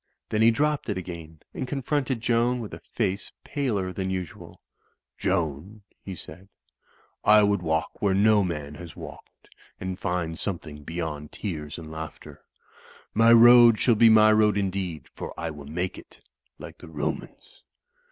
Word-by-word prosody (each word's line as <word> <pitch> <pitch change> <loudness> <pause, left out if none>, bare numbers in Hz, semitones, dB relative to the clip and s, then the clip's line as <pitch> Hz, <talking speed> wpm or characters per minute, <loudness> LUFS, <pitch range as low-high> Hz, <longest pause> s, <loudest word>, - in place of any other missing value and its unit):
Then 110 - 0
he 115 - +7
dropped 145 +3 0
it 100 - -1
again 85 -3 -8
and 130 - -4
confronted 135 -2 -1
Joan 120 +2 +1
with 110 -3 -7
a - - -7
face 95 +2 -3
paler 105 -11 -2
than 95 +1 -3
usual. 95 -3 -6 0.6
"Joan," 90 +3 -2 0.2
he 95 - -6
said, 90 +4 -12 0.7
"I 105 0 +6
would 100 -2 +2
walk 80 -1 -2
where 100 -2 +2
no 105 +1 +4
man 75 -5 -4
has 85 0 -10
walked; - - -12 0.3
and 95 0 -5
find 90 -5 -2
something 80 -6 -5
beyond 80 -2 -5
tears 80 -7 -5
and 80 -2 -9
laughter. 80 -1 -9 0.7
My 115 +1 +5
road 120 -1 +8
shall 120 - +4
be 115 +1 +6
my 110 -1 +7
road 105 -1 +3
indeed; 95 -5 -3
for - - -8
I 85 -1 -3
will 75 -2 -10
make 90 +5 -3
it, - - -18 0.3
like - - -11
the - - -12
Romans. - - -6
95 Hz, 155 wpm, -26 LUFS, 80-110 Hz, 0.7 s, road